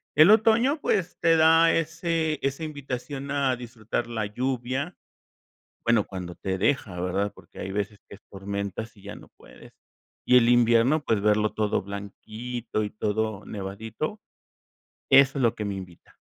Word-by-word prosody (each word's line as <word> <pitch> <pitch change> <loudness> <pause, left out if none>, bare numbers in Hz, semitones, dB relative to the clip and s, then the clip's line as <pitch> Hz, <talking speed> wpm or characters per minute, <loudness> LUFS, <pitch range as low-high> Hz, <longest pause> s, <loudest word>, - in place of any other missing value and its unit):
El 155 +7 +8
otoño, 230 +7 +4
pues, 185 -4 0
te 165 -1 +4
da 165 +1 +6
ese 165 -1 -1
esa 140 +3 -2
invitación 140 -2 -5
a 140 -2 +1
disfrutar 120 -1 -4
la 115 -2 -2
lluvia, 130 - -3 0.9
bueno, 115 -3 +3
cuando 90 -2 -7
te 95 +1 -3
deja, 105 -4 0
¿verdad? 95 +3 -1
Porque - - -16
hay 95 - -5
veces 100 +1 -3
que - - -11
es - - -26
tormentas 100 +3 -5
y 100 - -18
ya 100 +1 -8
no - - -14
puedes. - - -16 0.5
Y 125 - +6
el 115 - +3
invierno, 120 +5 +4
pues, 110 -4 +1
verlo 105 +1 +2
todo 105 -1 0
blanquito 110 +4 -5
y 105 - -3
todo 105 0 -2
nevadito, 110 - -5 0.9
eso 135 +1 +6
es - - 0
lo 115 -1 +3
que 110 - -5
me 100 -1 -3
invita. 90 -3 -11
115 Hz, 160 wpm, -26 LUFS, 100-140 Hz, 0.9 s, El